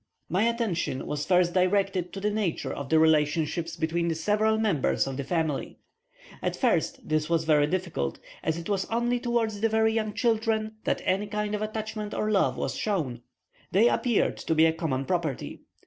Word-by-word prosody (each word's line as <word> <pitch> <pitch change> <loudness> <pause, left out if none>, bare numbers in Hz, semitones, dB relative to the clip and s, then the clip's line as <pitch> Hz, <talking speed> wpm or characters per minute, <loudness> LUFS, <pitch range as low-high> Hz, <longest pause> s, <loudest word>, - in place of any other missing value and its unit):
My 190 +6 +2
attention 205 - -2
was 150 0 -3
first 180 -2 +3
directed 185 -1 +1
to 195 - -5
the 210 +2 0
nature 205 -6 -2
of 140 -1 -6
the 160 - +4
relationships 160 +1 +2
between 170 +1 -1
the 165 - 0
several 210 +6 +2
members 205 -11 +1
of 135 -1 -4
the 140 - -3
family. 160 -1 -2 0.6
At - - -1
first - - 0
this 155 0 0
was 165 -1 +2
very 150 -2 +3
difficult, 170 - -2 0.2
as 160 0 -1
it 170 - -6
was 195 -2 0
only 240 +2 0
towards 230 -4 -1
the 225 - +3
very 220 0 +2
young 215 -2 -1
children 220 -2 0
that - - 0
any 195 +3 +1
kind 210 0 -2
of 210 - -2
attachment 215 0 -4
or 215 - 0
love 200 - +2
was - - -2
shown. 150 - -2 0.5
They 220 +6 +5
appeared 240 -4 +1
to 160 - -1
be 160 +1 +6
a 160 - +3
common 150 -5 -2
property. 165 -6 -2
185 Hz, 185 wpm, -27 LUFS, 160-215 Hz, 0.6 s, be